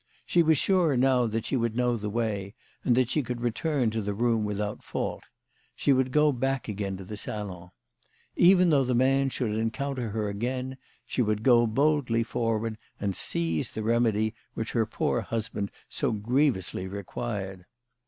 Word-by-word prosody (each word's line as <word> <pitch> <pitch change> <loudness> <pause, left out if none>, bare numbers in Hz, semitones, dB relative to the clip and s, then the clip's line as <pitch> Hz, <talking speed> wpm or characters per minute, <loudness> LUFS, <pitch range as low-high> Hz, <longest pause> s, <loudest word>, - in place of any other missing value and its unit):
She 175 - +3
was 160 -2 +4
sure 170 -5 +3
now 125 -1 +3
that 110 0 -2
she - - -1
would 115 -3 0
know 125 0 +2
the 105 -2 -3
way, 105 -2 -2 0.3
and 120 -1 +3
that 130 -2 +4
she 150 - +1
could 125 -2 -4
return 120 +1 0
to 110 0 -1
the 100 0 -3
room 115 0 +2
without 105 0 -3
fault. - - -4 0.5
She 140 - +3
would 130 -1 +1
go 150 +1 +4
back 135 0 -1
to 105 - -4
the 95 0 -4
salon. 95 -4 -6 0.7
Even 180 -1 +6
though 140 -3 +4
ths 125 -1 0
man 135 +2 +3
should 125 -4 -2
encounter 115 +2 -2
her 105 0 -2
again, 125 +5 -3 0.3
she - - -1
would 105 -1 0
go 120 -2 +5
boldly 130 -1 +2
forward 115 -1 -1 0.2
and 100 -2 -1
seize 80 -2 -1
the 110 - -5
remedy 110 -1 +2 0.2
which 110 - -3
her 115 -3 +1
poor - - 0
husband 110 -3 -3 0.2
so - - -1
grievously 110 - 0
required. 95 -1 -5
115 Hz, 170 wpm, -28 LUFS, 105-130 Hz, 0.7 s, Even